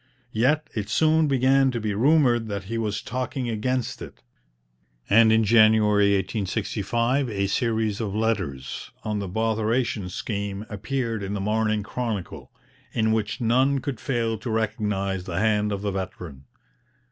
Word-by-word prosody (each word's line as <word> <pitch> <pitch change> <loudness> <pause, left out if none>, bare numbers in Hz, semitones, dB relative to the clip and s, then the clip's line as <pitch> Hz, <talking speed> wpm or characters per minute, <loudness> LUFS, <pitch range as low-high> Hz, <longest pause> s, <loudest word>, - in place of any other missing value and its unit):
Yet 145 +8 +2
it 105 -2 -4
soon 155 +5 +3
began 135 0 +3
to 120 -2 -2
be 105 -1 -2
rumoured 120 -1 +3
that 100 -2 -4
he 115 +4 -4
was 105 -2 -2
talking 125 +1 -3
against 120 +3 -2
it, - - -10 0.8
and 110 +1 +6
in 110 0 +4
January 105 -2 +5
1865 110 +6 -1
a 100 -2 -1
series 110 0 0
of 105 -2 -3
letters 95 -12 -2
on 105 -1 -2
'The 100 - -4
Botheration 110 0 0
Scheme' 100 +2 -4
appeared 115 +1 -3
in 100 +1 -3
the - - -2
Morning 110 +1 0
Chronicle, 110 -4 -5 0.4
in 110 -1 +1
which 110 +2 -1
none 130 +4 +3
could 135 -3 -4
fail 115 -4 -1
to 115 - -5
recognize 105 -4 -1
the 90 -3 -4
hand 105 -1 +2
of 100 0 -3
the 100 - -1
veteran. 90 -7 -6
110 Hz, 145 wpm, -25 LUFS, 100-120 Hz, 0.8 s, and